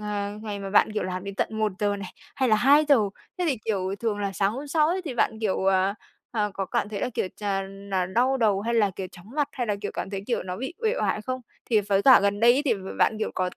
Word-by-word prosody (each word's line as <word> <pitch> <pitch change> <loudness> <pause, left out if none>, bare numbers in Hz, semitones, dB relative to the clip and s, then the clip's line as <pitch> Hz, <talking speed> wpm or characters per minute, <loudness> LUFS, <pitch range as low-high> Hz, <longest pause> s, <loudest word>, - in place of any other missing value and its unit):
ờ, 205 0 -3
ngày 210 -2 -4
mà 195 -1 -6
bạn, 210 +1 +4
kiểu, 210 - -1
làm 185 +1 -4
đến 200 0 -6
tận - - 0
1:00 205 -1 0
này, 195 -2 -7 0.2
hay 260 -2 +1
là 215 - +5
2:00, 285 +5 +5 0.4
thế 360 - 0
thì, 265 - 0
kiểu, 195 -3 -1
thường 220 -3 -1
là 200 -1 -2
sáng 195 +1 +1
hôm 275 +5 -6
sau 305 0 +3
ấy 365 +3 0
thì 275 - -4
bạn, 220 -2 +1
kiểu, 195 -3 0
ờ, 190 +1 +3 0.4
ờ, 210 -2 0
có 195 - -2
cảm - - -1
thấy 205 -2 -4
là, - - 0
kiểu, 185 - -1
ch 210 - -20 0.5
là 185 -2 +1
đau 250 +7 +2
đầu 210 -5 +2
hay 235 +2 -1
là, 210 -4 +3
kiểu, 190 - -4
chóng 180 +5 -14
mặt 295 -2 +1
hay 245 -3 -3
là, 210 - 0
kiểu, 205 - -3
cảm 190 - -4
thấy 195 - -3
kiểu 240 - -1
nó 180 0 -5
bị 265 +8 -5
uể 445 +1 +2
oải 215 - 0
không? 255 +1 -3 0.3
Thì 220 -3 +5
với 200 -1 +1
cả 260 +2 +8
gần 200 +1 +1
đây 235 +1 +7
ấy 275 +4 +1
thì 245 -6 +3
b - - -7 0.2
bạn, 215 - +3
kiểu, 215 - -1
có 185 -1 0
210 Hz, 280 wpm, -26 LUFS, 195-245 Hz, 0.5 s, cả